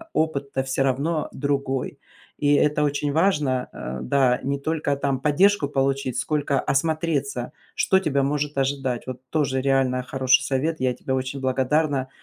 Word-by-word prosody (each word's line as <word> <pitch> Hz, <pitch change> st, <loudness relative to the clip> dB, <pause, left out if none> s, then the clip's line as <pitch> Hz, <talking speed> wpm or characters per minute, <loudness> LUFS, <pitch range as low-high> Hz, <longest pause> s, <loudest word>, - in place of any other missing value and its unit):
опыт-то 140 Hz, -4 st, -1 dB
всё 135 Hz, 0 st, 0 dB
равно 140 Hz, +5 st, 0 dB
другой. 140 Hz, -2 st, -2 dB, 0.4 s
И 145 Hz, 0 st, +3 dB
это 150 Hz, +1 st, +2 dB
очень 145 Hz, 0 st, 0 dB
важно, 150 Hz, -7 st, +1 dB
а, 65 Hz, +1 st, -6 dB
да, 130 Hz, -2 st, +2 dB
не 140 Hz, +1 st, -1 dB
только 150 Hz, -1 st, -1 dB
там 140 Hz, -1 st, -1 dB
поддержку 150 Hz, +3 st, +3 dB
получить, 135 Hz, -2 st, 0 dB
сколько 140 Hz, +1 st, 0 dB
осмотреться, 145 Hz, -4 st, -1 dB, 0.2 s
что 190 Hz, -, +3 dB
тебя 140 Hz, -6 st, +1 dB
может 145 Hz, 0 st, -1 dB
ожидать. 135 Hz, -3 st, -1 dB
Вот 130 Hz, -1 st, -6 dB
тоже 140 Hz, -4 st, 0 dB
реально 130 Hz, -2 st, +1 dB
хороший 130 Hz, +1 st, +2 dB
совет, 140 Hz, +4 st, -1 dB
я 130 Hz, -1 st, +2 dB
тебе 130 Hz, +2 st, -5 dB
очень 130 Hz, +1 st, -3 dB
благодарна. 130 Hz, +1 st, +1 dB
140 Hz, 145 wpm, -24 LUFS, 130-150 Hz, 0.4 s, И